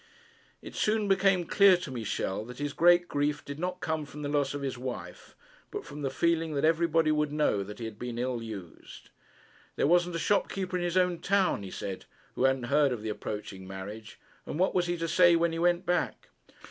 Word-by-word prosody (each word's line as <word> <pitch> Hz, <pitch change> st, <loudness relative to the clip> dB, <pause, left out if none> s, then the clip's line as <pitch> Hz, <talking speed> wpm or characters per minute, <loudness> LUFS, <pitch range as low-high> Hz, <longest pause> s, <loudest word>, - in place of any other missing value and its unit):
It -, -, -9 dB
soon 215 Hz, -1 st, +1 dB
became 195 Hz, -2 st, +3 dB
clear 195 Hz, +1 st, +6 dB
to 175 Hz, -6 st, -7 dB
Michel 110 Hz, -4 st, -3 dB
that 125 Hz, +1 st, -10 dB
his 145 Hz, -1 st, -3 dB
great 175 Hz, +1 st, +5 dB
grief 145 Hz, +1 st, -1 dB
did 140 Hz, +1 st, -7 dB
not 180 Hz, +1 st, -3 dB
come 160 Hz, -1 st, -1 dB
from 150 Hz, +1 st, -9 dB
the 145 Hz, -, -2 dB
loss 145 Hz, -1 st, 0 dB
of 140 Hz, -, -4 dB
his 135 Hz, -2 st, -2 dB
wife, 125 Hz, 0 st, -7 dB, 0.3 s
but 415 Hz, 0 st, -6 dB
from 150 Hz, -, -8 dB
the 135 Hz, -, -1 dB
feeling 165 Hz, +2 st, 0 dB
that 140 Hz, +2 st, +1 dB
everybody 165 Hz, -1 st, +3 dB
would 150 Hz, -1 st, +1 dB
know 150 Hz, -9 st, +1 dB
that 105 Hz, +1 st, -7 dB
he 115 Hz, -, -5 dB
had 110 Hz, -1 st, -8 dB
been 120 Hz, -1 st, -5 dB
ill 125 Hz, -1 st, -2 dB
used. 100 Hz, -7 st, -10 dB, 0.6 s
There -, -, +1 dB
wasn't 175 Hz, +2 st, +3 dB
a 165 Hz, -, -2 dB
shopkeeper 195 Hz, -2 st, 0 dB
in 180 Hz, -, -1 dB
his 175 Hz, +1 st, 0 dB
own 180 Hz, -2 st, +2 dB
town, 195 Hz, -, +1 dB
he 95 Hz, -, -7 dB
said, 95 Hz, 0 st, -6 dB, 0.3 s
who 130 Hz, -, +1 dB
hadn't 135 Hz, -1 st, +2 dB
heard 140 Hz, +2 st, +3 dB
of 115 Hz, -4 st, -4 dB
his 110 Hz, -, -2 dB
approaching 105 Hz, -3 st, -6 dB
marriage. 100 Hz, +3 st, -8 dB, 0.3 s
And -, -, -4 dB
what 185 Hz, +2 st, +2 dB
was 175 Hz, -1 st, +1 dB
he 175 Hz, 0 st, -1 dB
to 165 Hz, 0 st, -2 dB
say 175 Hz, +1 st, +5 dB
when 170 Hz, 0 st, +2 dB
he 165 Hz, -, -3 dB
went 175 Hz, +1 st, +2 dB
back? 175 Hz, -1 st, -1 dB
150 Hz, 215 wpm, -29 LUFS, 125-175 Hz, 0.6 s, clear